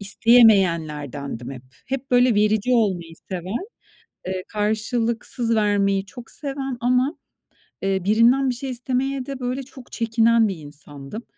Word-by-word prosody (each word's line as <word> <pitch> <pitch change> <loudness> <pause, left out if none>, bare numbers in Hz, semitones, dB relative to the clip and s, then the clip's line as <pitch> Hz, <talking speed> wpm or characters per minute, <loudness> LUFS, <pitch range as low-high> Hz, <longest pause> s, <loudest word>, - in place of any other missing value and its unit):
isteyemeyenlerdendim 165 - +2
hep. 130 -2 -9 0.2
Hep, 270 0 -4
böyle, 245 -2 +4
verici 215 +3 +2
olmayı 185 -8 +1 0.2
seven, 185 - -4 0.6
eee, 185 0 -3
karşılıksız 230 +2 -1
vermeyi 200 -2 +1
çok 230 +4 -11
seven 270 -2 -4
ama, 250 +5 +1 0.7
eee, 195 0 0
birinden 235 +6 +4
bir 245 - -1
şey 265 +2 -5
istemeye 255 +2 -2
de, 275 -1 -6
böyle, 255 +2 -3
çok 260 -1 -14
çekinen 230 -1 +3
bir 195 - -3
insandım. 145 +6 -10
225 Hz, 125 wpm, -22 LUFS, 190-250 Hz, 0.7 s, böyle